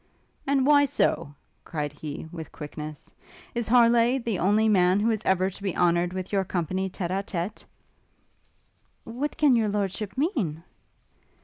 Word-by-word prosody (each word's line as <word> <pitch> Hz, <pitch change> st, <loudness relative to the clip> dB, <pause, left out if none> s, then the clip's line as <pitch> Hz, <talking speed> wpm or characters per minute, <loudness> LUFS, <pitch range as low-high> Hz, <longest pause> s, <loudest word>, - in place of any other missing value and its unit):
'And 270 Hz, -1 st, +2 dB
why 285 Hz, 0 st, +6 dB
so?' 145 Hz, -, 0 dB, 0.3 s
cried 150 Hz, -2 st, -4 dB
he, 150 Hz, +1 st, -7 dB
with 165 Hz, -3 st, -8 dB
quickness, 150 Hz, 0 st, -8 dB, 0.4 s
'Is 235 Hz, -2 st, -1 dB
Harleigh 235 Hz, +1 st, +5 dB
the 230 Hz, -6 st, -2 dB
only 210 Hz, +5 st, +3 dB
man 185 Hz, -2 st, +4 dB
who 225 Hz, +3 st, +2 dB
is 215 Hz, -2 st, -1 dB
ever 190 Hz, 0 st, +2 dB
to 195 Hz, -, -10 dB
be 195 Hz, -3 st, -3 dB
honoured 175 Hz, 0 st, +2 dB
with 185 Hz, +1 st, -6 dB
your 195 Hz, -1 st, +2 dB
company 185 Hz, +1 st, -2 dB
tête 180 Hz, -1 st, -4 dB
à 195 Hz, +1 st, 0 dB
tête?' 190 Hz, +1 st, -4 dB, 1.4 s
'What 255 Hz, +6 st, -4 dB
can 295 Hz, -4 st, +5 dB
your 220 Hz, -2 st, +2 dB
lordship 205 Hz, +2 st, -3 dB
mean?' 225 Hz, -, -1 dB
195 Hz, 150 wpm, -26 LUFS, 175-230 Hz, 1.4 s, why